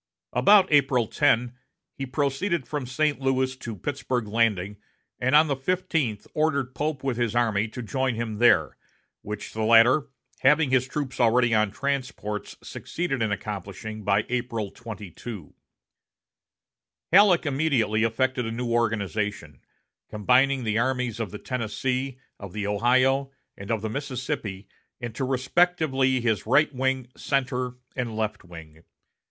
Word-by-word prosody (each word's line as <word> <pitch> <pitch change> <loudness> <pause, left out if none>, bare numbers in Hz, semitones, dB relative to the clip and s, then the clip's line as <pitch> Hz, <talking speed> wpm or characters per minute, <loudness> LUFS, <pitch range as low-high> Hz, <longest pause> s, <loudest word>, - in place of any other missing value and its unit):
About 200 -1 +6
April 135 -5 +4
10 120 +3 +2 0.4
he 135 - -5
proceeded 140 +4 -1
from 145 -4 -4
St. 150 +3 0
Louis 130 0 +1
to 120 -4 -6
Pittsburg 125 0 -3
Landing, 105 -3 0 0.4
and 130 +3 +2
on 155 +1 +7
the 140 - 0
fifteenth 145 - -1
ordered 140 -5 0
Pope 150 0 -3
with 130 -4 -1
his 120 -2 -1
army 115 -3 +2
to 125 +3 -7
join 130 +2 -1
him 110 -2 -4
there, 120 0 +4 0.4
which 105 0 -7
the 110 - -3
latter, 115 +6 +5 0.3
having 145 +1 +4
his 130 -1 +3
troops 140 -1 -4
already 120 0 +4
on 110 -1 +3
transports 125 -4 -4
succeeded 165 -7 -4
in 110 -2 +1
accomplishing 105 +2 -5
by 100 +1 +2
April 120 -4 -2
22. 105 -3 -9 1.6
Halleck 190 -3 +6
immediately 135 -7 +1
effected 125 +1 0
a - - -3
new 120 +1 -3
organization, 105 - -1 0.5
combining 130 +5 +2
the 110 0 0
armies 125 -2 -1
of 110 -3 -2
the 105 - -7
Tennessee, 125 +3 -3 0.2
of 100 -3 -9
the 105 -1 -3
Ohio, 130 +6 +2 0.3
and 95 - -10
of 110 -2 -1
the - - -1
Mississippi 125 -6 -4 0.3
into 120 +2 -4
respectively 135 0 +2
his 110 -3 0
right 150 +5 +4
wing, 130 -1 -1
center, 125 -2 -1 0.2
and 120 -4 -3
left 110 -1 -2
wing. 80 -2 -13
125 Hz, 135 wpm, -25 LUFS, 110-135 Hz, 1.6 s, on